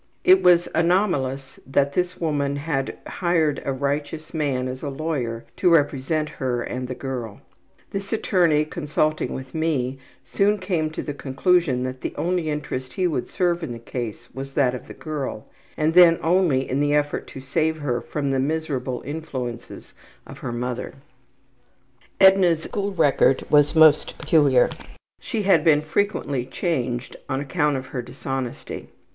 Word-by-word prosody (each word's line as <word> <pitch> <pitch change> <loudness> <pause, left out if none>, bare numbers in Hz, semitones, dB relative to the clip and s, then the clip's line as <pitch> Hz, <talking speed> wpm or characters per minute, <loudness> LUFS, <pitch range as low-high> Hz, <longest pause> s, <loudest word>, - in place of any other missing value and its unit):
'' - - -43
It 375 - +4
was 175 -1 +5
anomalous 165 -7 0
that 140 +1 +1
this 180 +2 -1
woman 145 -4 0
had 140 -2 -2
hired 165 -5 0
a 140 - -1
righteous 145 +4 -3
man 140 -5 -1
as 130 0 -6
a 145 - -3
lawyer 135 -6 -3
to 180 - +3
represent 150 -1 +2
her 125 -2 0
and 125 0 -4
the 125 - -5
girl. 125 -6 -5 0.5
This 195 0 -5
attorney, 175 -8 +2
consulting 155 -1 -1
with 130 0 -8
me, 140 -5 -1 0.3
soon 205 +1 +2
came 180 -5 -1
to 155 - -5
the 145 - -4
conclusion 140 -1 +1
that 130 0 -5
the - - -4
only 175 -2 -1
interest 130 -4 -4
he 185 - 0
would 155 -8 -1
serve 175 -2 0
in 140 -7 -4
the - - -7
case 115 -1 -6
was 135 +1 -7
that 130 -3 +3
of 125 - -7
the - - -10
girl, 145 -8 -5 0.3
and 155 +1 +1
then 175 -1 +7
only 165 -6 +2
in 130 - -1
the 145 0 +2
effort 145 0 -1
to - - -9
save 160 +4 0
her 125 -5 -2
from 140 -2 -3
the 135 - +1
miserable 135 -3 -2
influences 130 -6 -6 0.3
of - - -11
her 125 - -4
mother. 125 +2 -4 1.2
Edna's 190 -4 +5
school 200 0 -3
record 140 -4 +3
was 150 +1 +5
most 155 -1 +5
peculiar. 140 -6 +4 0.5
She 215 - -3
had 195 0 +4
been 150 -3 +4
frequently 150 - -1
changed 125 -7 -2
on 135 - -1
account 145 0 0
of 130 - -6
her 125 - -2
dishonesty. 130 0 -6
145 Hz, 160 wpm, -23 LUFS, 130-165 Hz, 1.2 s, then